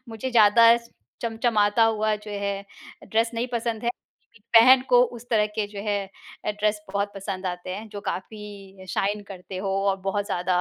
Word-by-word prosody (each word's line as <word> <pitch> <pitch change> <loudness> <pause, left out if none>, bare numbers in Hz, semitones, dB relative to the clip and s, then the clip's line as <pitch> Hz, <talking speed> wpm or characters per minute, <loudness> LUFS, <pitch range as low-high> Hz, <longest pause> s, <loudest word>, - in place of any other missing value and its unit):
मुझे 225 +4 -5
ज़्यादा 230 +1 +6 0.5
चमचमाता 225 -2 +2
हुआ 215 -1 +1
जो 210 0 -11
है, 200 -1 -3 0.4
ड्रेस 225 +1 +1
नहीं 235 +2 -1
पसंद 230 -1 -2
है - - +1
लेकिन 235 -3 -19 0.2
बहन 255 +2 +7
को 245 0 +7 0.2
उस 245 - -16
तरह 210 -2 +3
के 215 - 0
जो 205 -1 -8
है 205 -1 +1 0.5
ड्रेस 210 0 0
बहुत 200 0 -1
पसंद 195 -1 -5
आते 180 0 -5
हैं, 215 +2 -8
जो 205 -1 -8
काफ़ी 195 -1 -7
शाइन 205 +1 -1
करते 185 0 -8
हो 195 0 -3 0.2
और 195 - -1
बहुत 205 0 -1
ज़्यादा 180 -2 0
210 Hz, 175 wpm, -25 LUFS, 200-225 Hz, 0.5 s, बहन